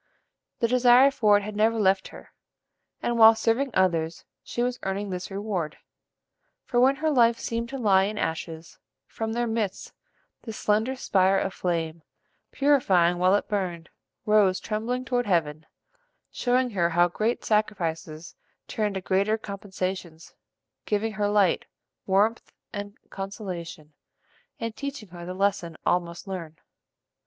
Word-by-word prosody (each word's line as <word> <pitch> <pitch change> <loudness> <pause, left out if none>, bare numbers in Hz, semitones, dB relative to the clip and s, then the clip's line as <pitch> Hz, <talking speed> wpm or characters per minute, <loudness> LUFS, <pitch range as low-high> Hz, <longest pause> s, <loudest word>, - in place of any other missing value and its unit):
The 230 - +3
desire 250 +2 +6
for 210 -6 +4
it 205 - -3
had 210 0 -6
never 220 +2 +2
left 190 -1 +2
her, - - -14 0.7
and, 235 -1 0
while 225 0 +9
serving 230 +5 +1
others, 165 -3 +1 0.2
she 240 - -3
was 250 0 -2
earning 195 +1 -3
this 180 0 -5
reward; 195 -6 -3 0.9
for 240 - 0
when 265 +2 +5
her 310 +2 0
life 235 -4 +4
seemed 230 0 -3
to 275 - -5
lie 195 -6 +4
in 210 +1 -4
ashes, 160 -2 -4 0.3
from 225 +7 -4
their 240 +1 0
midst, 225 -4 -3 0.5
this 225 -2 -8
slender 220 +5 +1
spire 195 -6 +2
of 190 - -1
flame, 165 -2 -2 0.5
purifying 190 -12 +3
while 185 +2 +4
it 205 - -1
burned, 180 -5 -3 0.4
rose 210 -3 +4
trembling 235 +4 -3
toward 245 -2 -1
heaven; 155 -4 0 0.6
showing 250 0 +1
her 175 -4 +1
how 175 +1 +4
great 215 +7 -2
sacrifices 170 -6 -2 0.3
turn 210 -2 -2
to 190 - -3
greater 200 +4 +1
compensations; 190 -5 -6 0.5
giving 215 +1 0
her 210 -1 -1
light, 205 -3 +2 0.4
warmth, 205 +4 +1 0.2
and 205 0 -6
consolation, 180 -6 -7 0.7
and 230 -1 -4
teaching 280 -5 -6
her 175 0 -9
the 180 - -5
lesson 190 -4 -1
all 180 - +4
must 170 +2 -10
learn. 170 -5 -6
205 Hz, 145 wpm, -26 LUFS, 180-225 Hz, 0.9 s, while